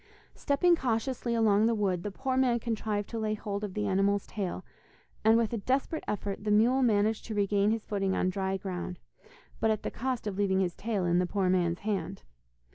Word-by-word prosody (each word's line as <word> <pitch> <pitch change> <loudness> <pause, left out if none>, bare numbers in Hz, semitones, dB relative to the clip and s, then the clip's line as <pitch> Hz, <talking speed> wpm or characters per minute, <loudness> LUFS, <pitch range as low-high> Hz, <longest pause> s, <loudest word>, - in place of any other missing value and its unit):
Stepping 340 +5 +3
cautiously 240 -2 -1
along 220 -1 +4
the 230 - +2
wood, 190 -4 0
the 205 - -3
poor 260 +6 -2
man 255 -2 +3
contrived 215 -3 -2
to 230 - -5
lay 215 -1 -1
hold 205 -1 -4
of 200 -3 -5
the 210 -1 -1
animal's 200 0 +1
tale, 190 -3 -4 0.6
and 220 +1 +6
with 230 0 0
a 230 - -1
desperate 265 - -1
effort 200 -1 -3
the 215 - -2
mule 235 +6 +4
managed 220 -2 +2
to 220 - -5
regain 200 0 +2
his 220 0 -1
footing 195 -2 -1
on 185 - +1
dry 190 0 -1
ground, 180 -2 -5 0.6
but 225 - +2
at 215 -1 0
the - - -3
cost 255 -1 -3
of 205 -2 -3
leaving 190 -2 +2
his 180 -2 0
tail 205 -3 -2
in 175 0 +3
the 180 - +1
poor 190 -1 +1
man's 175 -2 +1
hand. 200 - -3
210 Hz, 205 wpm, -29 LUFS, 195-230 Hz, 0.6 s, and